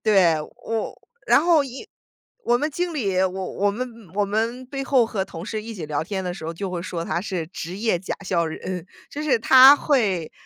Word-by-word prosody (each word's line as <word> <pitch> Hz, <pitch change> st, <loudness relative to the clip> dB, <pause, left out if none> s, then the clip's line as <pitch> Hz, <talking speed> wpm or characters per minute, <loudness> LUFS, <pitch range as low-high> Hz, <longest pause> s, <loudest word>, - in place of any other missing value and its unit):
对， 190 Hz, -7 st, +4 dB, 0.3 s
我 225 Hz, -1 st, -3 dB, 0.3 s
然 -, -, +6 dB
后 330 Hz, -4 st, +5 dB
因 270 Hz, -1 st, -8 dB, 0.6 s
我 240 Hz, 0 st, +3 dB
们 300 Hz, +4 st, 0 dB
经 345 Hz, +3 st, -2 dB
理， 200 Hz, -11 st, -1 dB
我 190 Hz, -, +3 dB
我 190 Hz, +2 st, -1 dB
们 250 Hz, +5 st, -4 dB, 0.3 s
我 205 Hz, 0 st, +2 dB
们 230 Hz, +5 st, -2 dB
背 275 Hz, +1 st, -5 dB
后 260 Hz, -4 st, +3 dB
和 200 Hz, -4 st, -2 dB
同 175 Hz, 0 st, -9 dB
事 215 Hz, -2 st, -4 dB
一 230 Hz, -, -7 dB
起 175 Hz, -8 st, -6 dB
聊 150 Hz, 0 st, -1 dB
天 190 Hz, +1 st, -4 dB
的 180 Hz, -1 st, -3 dB
时 160 Hz, -, -9 dB
候， 165 Hz, -, -3 dB
就 195 Hz, +3 st, -5 dB
会 175 Hz, -1 st, -4 dB
说 170 Hz, -2 st, -4 dB
他 170 Hz, +2 st, -1 dB
是 180 Hz, -5 st, -3 dB
职 180 Hz, +1 st, -7 dB
业 220 Hz, -5 st, +1 dB
假 185 Hz, -, -4 dB
笑 170 Hz, -3 st, +1 dB
人。 175 Hz, +2 st, -5 dB, 0.2 s
就 295 Hz, -, -6 dB
是 265 Hz, -6 st, +2 dB
他 265 Hz, +4 st, +8 dB
会 205 Hz, -, 0 dB
205 Hz, 230 characters per minute, -23 LUFS, 180-250 Hz, 0.6 s, 他